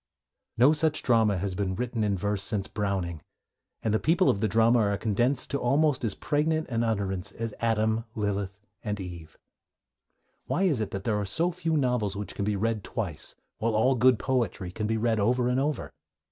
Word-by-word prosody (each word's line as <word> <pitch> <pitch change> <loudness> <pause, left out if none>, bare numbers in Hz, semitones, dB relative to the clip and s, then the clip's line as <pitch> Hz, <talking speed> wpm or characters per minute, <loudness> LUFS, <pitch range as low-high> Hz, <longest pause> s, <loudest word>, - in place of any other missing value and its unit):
No 130 +6 +6
such 155 0 +1
drama 110 -5 +3
has 95 +1 -2
been 95 0 -2
written 120 0 -2
in 100 -2 +1
verse 100 +1 -1
since 100 -2 -1
Browning, 95 -6 -2 0.6
and 110 - +1
the 110 - +3
people 175 +4 +3
of 100 - -3
the 110 - +1
drama 115 +4 +4
are 100 -2 +1
condensed 120 +6 0
to 140 - 0
almost 140 +2 +2
as 110 -4 -1
pregnant 155 +2 0
an 115 -2 0
utterance 100 -5 -2
as 115 -1 -4
Adam, 110 0 +1
Lilith, 100 -2 -2 0.2
and 105 -1 -3
Eve. 85 -4 -8 1.1
Why 190 - 0
is 160 -11 +2
it 110 - -2
that 95 -1 -5
there 105 -3 0
are - - -1
so 165 - +1
few 165 -2 -1
novels 125 -7 0
which 105 0 -5
can 100 - -3
be 105 0 0
read 110 0 -1
twice, 100 - -4 0.2
while 115 0 0
all 125 +5 +4
good 125 0 +4
poetry 110 -9 -1
can 105 +3 -3
be 110 +1 0
read 110 0 +1
over 120 +4 +2
and 125 +1 +1
over? 145 0 -2
110 Hz, 195 wpm, -27 LUFS, 100-125 Hz, 1.1 s, No